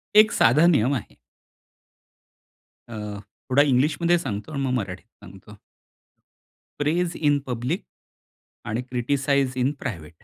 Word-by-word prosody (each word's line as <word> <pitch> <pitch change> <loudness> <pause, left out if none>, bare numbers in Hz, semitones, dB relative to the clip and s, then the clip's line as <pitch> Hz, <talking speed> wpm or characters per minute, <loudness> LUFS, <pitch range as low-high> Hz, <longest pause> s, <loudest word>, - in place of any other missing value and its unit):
एक 215 0 +7
साधा 145 +8 +4
नियम 135 -5 +3
आहे. 125 - -7 1.7
अ, 115 - -7 0.6
थोडा 140 - +6
इंग्लिशमध्ये 150 +6 +2
सांगतो 105 -1 -5
आणि 140 - -3
मग 130 - -1
मराठीत 100 -4 -4 0.2
सांगतो. 95 +3 -14 1.2
प्रेज 165 +4 0
इन 145 -2 +2
पब्लिक 125 - -2 0.8
आणि 110 +3 -2
क्रिटिसाइज 130 +2 0
इन 130 +2 +2
प्रायव्हेट. 85 - -7
130 Hz, 110 wpm, -24 LUFS, 115-150 Hz, 1.7 s, एक